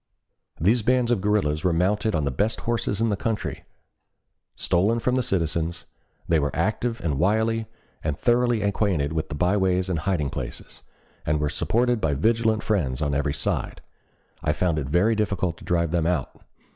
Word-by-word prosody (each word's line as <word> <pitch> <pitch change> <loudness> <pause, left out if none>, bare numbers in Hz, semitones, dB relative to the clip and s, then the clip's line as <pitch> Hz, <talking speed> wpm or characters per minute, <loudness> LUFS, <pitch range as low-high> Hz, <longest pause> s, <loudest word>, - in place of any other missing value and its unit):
"These 110 +9 +3
bands 125 +1 +2
of 115 -6 +1
guerrillas 95 -7 +1
were 90 -2 +2
mounted 105 +5 +1
on 75 -3 0
the 70 - 0
best 105 - -1
horses 115 -3 -1
in 115 - +2
the 105 - +1
country, 110 +2 -3 0.9
stolen 100 +6 +1
from 125 +2 0
the 130 - +2
citizens; 85 -5 -1 0.4
they 85 -2 +3
were 70 -1 0
active 110 +6 -1
and 75 -5 -1
wily, 110 +4 +1 0.4
and 75 -2 -1
thoroughly 120 -2 +2
acquainted 95 -8 0
with 80 -1 -2
the 75 - -4
byways 95 +1 +1
and 85 -3 0
hiding 80 -5 -1
places; - - -7 0.4
and 75 0 0
were 75 -1 0
supported 120 +8 +1
by 75 -3 +1
vigilant 110 +6 +1
friends 70 - 0
on 75 -2 0
every 70 +1 0
side. - - -2 0.6
I 75 -2 +1
found 80 0 0
it 70 - -4
very 90 +9 +3
difficult 100 -5 -1
to - - -14
drive 85 -2 +1
them 85 -2 +1
out. 85 -7 -2
95 Hz, 175 wpm, -24 LUFS, 80-110 Hz, 0.9 s, These